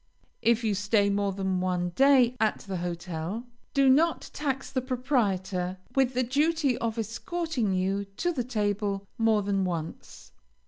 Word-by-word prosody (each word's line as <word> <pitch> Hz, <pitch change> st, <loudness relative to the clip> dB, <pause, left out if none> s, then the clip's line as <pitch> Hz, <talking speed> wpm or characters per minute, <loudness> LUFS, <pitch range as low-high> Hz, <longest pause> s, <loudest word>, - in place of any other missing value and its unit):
If 235 Hz, 0 st, +3 dB
you 215 Hz, -2 st, +1 dB
stay 205 Hz, +1 st, +2 dB
more 200 Hz, 0 st, +1 dB
than 190 Hz, -1 st, -1 dB
one 180 Hz, -1 st, 0 dB
day 255 Hz, +3 st, +4 dB
at 220 Hz, -1 st, +1 dB
the 195 Hz, -2 st, -5 dB
hotel, 175 Hz, +3 st, -4 dB, 0.3 s
do 275 Hz, -1 st, +5 dB
not 310 Hz, +5 st, +3 dB
tax 270 Hz, -2 st, -3 dB
the 260 Hz, -, 0 dB
proprietor 205 Hz, -8 st, -1 dB, 0.2 s
with 260 Hz, -2 st, +2 dB
the 255 Hz, -, +2 dB
duty 290 Hz, +1 st, +1 dB
of 230 Hz, -1 st, -2 dB
escorting 245 Hz, -, -2 dB
you 195 Hz, +2 st, 0 dB
to 350 Hz, -, 0 dB
the 255 Hz, -6 st, -1 dB
table 205 Hz, -4 st, -1 dB
more 220 Hz, -2 st, +3 dB
than 195 Hz, -1 st, 0 dB
once. 165 Hz, -3 st, -5 dB
215 Hz, 150 wpm, -28 LUFS, 190-260 Hz, 0.3 s, do